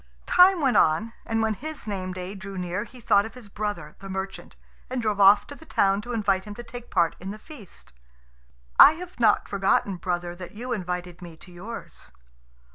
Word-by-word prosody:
Time 360 -1 +6
went 270 -3 +2
on, 210 +9 +2
and 225 -1 0
when 220 -1 +1
his 310 +9 -8
name 190 -3 -4
day 185 +1 -6
drew 195 -1 -8
near 180 +3 -3
he 250 +3 -15
thought 200 -3 +3
of 225 +3 -9
his 240 -5 -12
brother, 200 -7 -4
the 195 - -9
merchant, 190 0 -6 0.3
and 255 0 -2
drove 215 -3 -1
off 200 +1 +7
to - - -9
the 305 - -14
town 200 -9 +1
to 240 - -8
invite 200 -4 0
him 210 -1 -8
to 240 - -8
take 240 +1 -10
part 170 -3 +2
in 190 - -7
the 210 - -6
feast. 215 - -13 0.9
"I 300 - +11
have 355 -2 -10
not 220 -3 +3
forgotten, 195 -1 +1
brother, 175 -1 -3
that 180 -1 -9
you 245 +3 -4
invited 180 -3 -4
me 170 -2 -10
to 180 - -15
yours." 205 +7 -9
205 Hz, 200 wpm, -25 LUFS, 185-235 Hz, 0.9 s, I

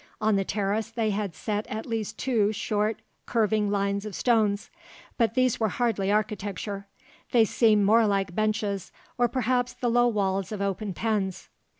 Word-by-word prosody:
On 215 -1 +2
the 195 - +2
terrace, 205 +3 -1
they 225 -2 -1
had 200 -4 -3
set 210 +3 -3
at 220 +1 -5
least 225 -4 -3
two 225 -6 +1
short 215 +1 -1 0.2
curving 215 -2 +1
lines 200 0 0
of 210 -3 -6
stones; 215 -4 +1 0.4
but 230 -1 +1
these 255 -2 +2
were 220 - +2
hardly 205 -3 0
architecture; 205 -1 -2 0.5
they 230 -2 +6
seem 215 -1 +3
more 220 +2 +5
like 195 -3 0
benches 215 -2 -1 0.3
or 245 - +4
perhaps 250 0 0
the 240 -2 -1
low 240 +1 +4
walls 195 -4 0
of 210 - -4
open 200 0 -2
pens. 205 -5 -2
215 Hz, 165 wpm, -27 LUFS, 200-225 Hz, 0.5 s, they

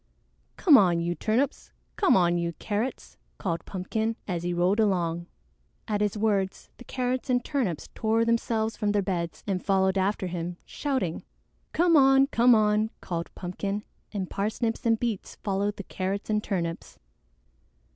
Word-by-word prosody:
"Come 300 -9 +7
on, 175 -3 +3
you 170 +1 -1
Turnips! 225 +9 -1 0.2
Come 390 - +4
on, 175 -1 +3
you 170 -1 -1
Carrots!" 215 +9 -4 0.2
called 170 -3 -2
Pumpkin, 220 +4 -2
as 175 -4 -2
he 175 +1 -2
rolled 180 +4 +2
along. 175 -5 +1 0.6
At 210 -2 -1
his 210 0 0
words 200 -3 0
the - - -11
Carrots 255 +1 -2
and 245 -1 +2
Turnips 235 - -1
tore 225 +1 +1
themselves 230 -1 0
from 210 -1 0
their 205 -1 +2
beds 175 -3 -3
and 190 -3 -2
followed 190 -1 +2
after 195 0 0
him, 175 -1 -4
shouting. 260 - -2 0.5
"Come 340 0 +3
on! 270 -1 +6
Come 245 -3 +5
on!" 215 0 +3
called 170 -1 -4
Pumpkin, 195 +3 -3 0.3
and 195 -3 -3
Parsnips 225 +4 -2
and 225 -1 +3
Beets 230 -5 -3
followed 200 0 0
the 200 - -5
Carrots 195 +3 -3
and 210 0 +1
Turnips. 170 -4 -3
205 Hz, 155 wpm, -27 LUFS, 180-230 Hz, 0.6 s, Come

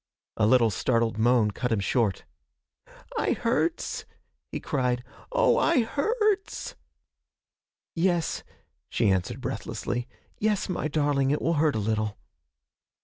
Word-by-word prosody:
A 105 - +3
little 115 -2 +5
startled 115 +1 +1
moan 115 -2 +4
cut 125 +5 -3
him 110 - +2
short. 105 0 0 0.9
'I - - +2
hurts!' 260 +8 -1 0.5
he - - -3
cried. 125 -3 -1 0.3
'Oh, - - +4
I 250 - +3
hurts!' 415 - 0 1.2
'Yes,' 175 -1 +1 0.5
she 110 -4 +2
answered 95 -2 -1
breathlessly, 120 +1 -3 0.3
'yes, 210 -1 +1
my 180 -4 -1
darling, 145 -3 +1
it 145 - +1
will 165 - +1
hurt 155 -1 +2
a - - +1
little.' 110 0 -1
135 Hz, 120 wpm, -27 LUFS, -, 1.2 s, little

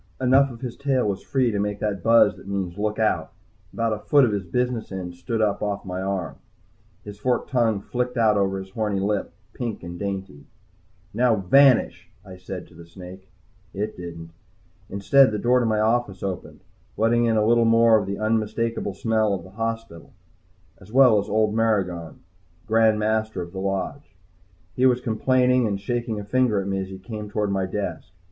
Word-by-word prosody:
Enough 135 +2 +4
of 115 -2 -11
his 125 -2 -5
tail 135 -4 0
was 100 -2 -2
free 130 -4 0
to 105 - -2
make 105 0 -2
that 100 -3 -2
buzz 115 -1 +5
that - - -15
means 95 -3 -3
"Look 105 0 -1
out!" 110 -1 0 0.4
About 115 -1 -1
a 105 - -4
foot 140 +5 +4
of 115 - 0
his 100 -2 -2
business 125 +5 -2
end 90 -2 -5
stood 110 +6 -2
up 105 -2 0
off 100 -1 -3
my 90 0 -4
arm. 95 -7 -3 0.7
His 105 -1 -10
forked 125 +2 -1
tongue 115 -5 +1
flicked 125 +3 -3
out 110 -2 +4
over 95 -1 +1
his 95 0 -8
horny 105 -2 -1
lip, 100 +1 -1 0.2
pink 120 -6 -5
and 85 0 -8
dainty. 95 -7 -5 0.7
"Now, 120 +1 +3
vanish!" 125 +7 +3 0.2
I 95 -1 -11
said 90 0 -7
to - - -19
the 85 0 -13
snake. 95 +2 -12 0.5
It 105 +2 -3
didn't. 85 -2 -9 0.6
Instead 130 +7 +4
the 105 - -2
door 125 +4 +3
to 120 - 0
my 110 -1 +1
office 110 -3 0
opened, 95 -2 -5 0.4
letting 120 +2 +2
in 115 -1 +2
a 105 - +2
little 115 +1 +4
more 115 -1 +5
of 100 - -5
the 100 0 -3
unmistakable 110 -1 -1
smell 110 -1 +1
of 90 - -7
the 95 - -14
hospital, 115 -4 -5 0.7
as 95 - -16
well 125 -4 +6
as 100 - -5
old 110 0 +1
Maragon, 95 -7 -1 0.4
Grand 110 -1 +3
Master 110 -2 -1
of 85 - -11
the 95 - -6
Lodge. 95 +9 -4 0.6
He 130 +1 +4
was 125 -1 +2
complaining 125 +1 +2
and 100 -2 -2
shaking 115 +1 -3
a - - -6
finger 115 0 +1
at 95 - -4
me 95 0 -1
as 95 - -4
he 95 - -8
came 105 +2 -7
toward 105 -1 -1
my 95 -1 -1
desk. 90 -4 -5
105 Hz, 195 wpm, -23 LUFS, 95-115 Hz, 0.7 s, well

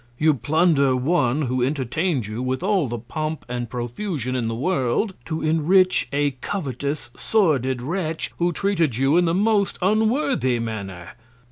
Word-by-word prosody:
You 155 +2 +4
plunder 140 +1 +2
One, 135 0 +1
who 130 -1 0
entertain'd 140 - -1
you 110 +3 -5
with 130 +5 -2
all 190 -7 +2
the 120 0 -3
Pomp 155 +7 -4
and 120 -1 -4
Profusion 130 - -3
in 120 -3 -1
the 115 - -2
World, 140 - 0
to 160 -1 -3
enrich 165 +4 +3
a 145 0 +1
covetous, 140 - -3
sordid 130 - +1
Wretch, 165 +1 -3
who 175 0 +2
treated 170 - 0
you 135 +4 +3
in 175 0 +4
the 165 0 +1
most 205 0 +2
unworthy 215 - +1
Manner. 100 -6 -5
145 Hz, 150 wpm, -23 LUFS, 125-175 Hz, -, You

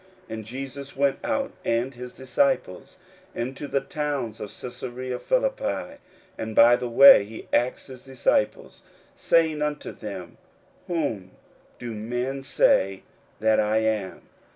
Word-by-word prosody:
41:008:027 - - -6
And 110 -1 -6
Jesus 135 +3 -7
went 140 0 +2
out, 280 -1 -1
and 120 +3 0
his 125 0 -8
disciples, 130 - -1 0.4
into 130 +4 -4
the 140 - 0
towns 135 -5 -3
of 105 - -5
Caesarea 125 +1 -6
Philippi: - - -1 0.4
and 110 -1 -4
by 120 +1 +7
the 125 0 -4
way 125 -2 +9
he 110 +2 -10
asked 125 +1 +1
his 130 -2 -11
disciples, 130 -5 -1 0.3
saying 160 -2 +2
unto 150 0 -2
them, 95 -5 -8 0.5
Whom 140 - -2 0.5
do 120 -2 -6
men 125 +5 -3
say 95 -7 +2 0.4
that 110 0 +3
I 110 +1 +2
am? 110 -3 -1
125 Hz, 130 wpm, -25 LUFS, 110-140 Hz, 0.5 s, way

